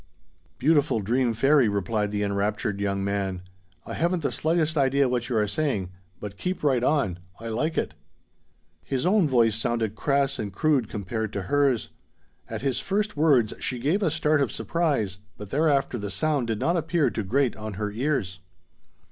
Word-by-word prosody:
"Beautiful 145 - +3
dream 120 +4 +1
fairy," 135 0 +4
replied 105 +1 -1
the 105 0 -1
enraptured 100 0 -1
young 100 -1 -1
man, 95 -2 -2 0.4
"I - - -6
haven't 170 0 0
the - - 0
slightest 160 0 0
idea 140 -1 +3
what 125 0 -1
you 120 - 0
are 105 -1 +2
saying, 105 - -1 0.3
but 100 -1 -7
keep 180 - -3
right 130 -5 +2
on. 130 - +1 0.2
I 115 +1 -6
like 150 +9 -1
it." - - -1 0.9
His 135 -2 -2
own 190 -2 +4
voice 115 -5 +3
sounded 115 -1 -1
crass 140 +3 0
and 105 -2 -3
crude 130 +2 +1
compared 110 +1 -3
to 100 - -3
hers. 135 +2 +1 0.6
At - - -5
his 135 -3 0
first 210 +2 -1
words 140 -8 +3
she 125 - -1
gave 150 - 0
a 190 - +2
start 155 -1 +2
of 130 -7 +1
surprise, 140 - -1 0.2
but 105 -2 -9
thereafter 140 -4 +1
the 100 0 -4
sound 145 -1 0
did 110 -2 -1
not 170 +10 +1
appear 165 -1 +1
to - - -2
grate 125 +5 +1
on 110 -1 -6
her 105 +1 -3
ears. 110 -6 -1
125 Hz, 175 wpm, -26 LUFS, 105-150 Hz, 0.9 s, fairy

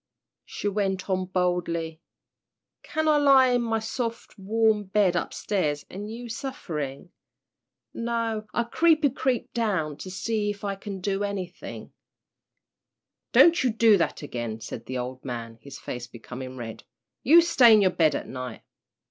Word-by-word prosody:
She - - -5
went 195 -2 -1
on 185 0 0
boldly, 175 -3 -1 0.8
"Can 315 0 -2
I 305 -1 +5
lie 275 -3 +6
in 245 -1 +2
my 225 -1 0
soft, 230 +1 -4
warm 215 +1 +1
bed 190 -2 +2
up 175 - -1
stairs 150 -8 -1
an' 205 +3 -6
you 230 +3 -7
a - - -9
sufferin'? 175 - -5 0.8
No, 230 -2 -2
I 235 - 0
creepy, 310 +3 +3
creepy 255 -1 -1
down, 185 -11 -1
to 185 - -8
see 210 +2 -1
if 205 -1 -5
I 200 -1 -1
can 195 -1 -7
do 195 +1 -1
anythin'." 190 -3 -6 1.4
"Don't 340 -3 +6
you 250 - +2
do 225 -1 +5
that 165 -3 -1
again," 120 -5 -4
said 115 +1 -8
the 130 - -3
old 125 +1 -5
man, 115 -3 -6
his 140 +1 -10
face 125 0 -6
becoming 125 +2 -9
red. 115 -2 -7 0.4
"You 325 +6 +7
stay 275 -8 +6
in 215 -1 +7
your 185 - +4
bed 160 -3 +2
at - - -4
night." 125 -3 -7
195 Hz, 155 wpm, -26 LUFS, 150-230 Hz, 1.4 s, You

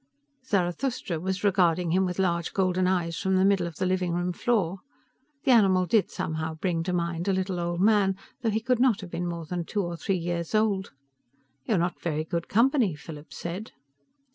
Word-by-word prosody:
Zarathustra 195 -3 -1
was 185 +2 -3
regarding 180 -4 +3
him 190 +2 +3
with 180 - -4
large 170 -3 0
golden 185 -1 +1
eyes 170 -3 0
from 190 0 +1
the 185 +1 +4
middle 195 -3 +3
of 170 - -8
the 185 - -1
living 185 -1 0
room 175 +1 -1
floor. 195 -3 0 0.6
The 270 - +3
animal 190 -6 +5
did 200 +4 +2
somehow 160 0 -3
bring 165 0 -1
to 180 - -1
mind 170 0 -2
a 195 - +3
little 185 -1 -1
old 175 0 -2
man, 200 -2 +3 0.3
although 225 - +2
he 220 +1 0
could 250 +1 +1
not 240 -5 +3
have 185 -3 -9
been 175 +1 -2
more 170 -1 -4
than 175 +2 -3
two 205 +4 -2
or 175 -1 -4
three 195 +2 -1
years 170 +2 -3
old. 205 -3 +1 0.8
"You're 215 - +2
not 175 +1 -1
very 155 -2 -1
good 170 +1 -3
company," 235 - +3
Philip 150 0 -10
said. 180 +6 -6
185 Hz, 195 wpm, -27 LUFS, 170-200 Hz, 0.8 s, animal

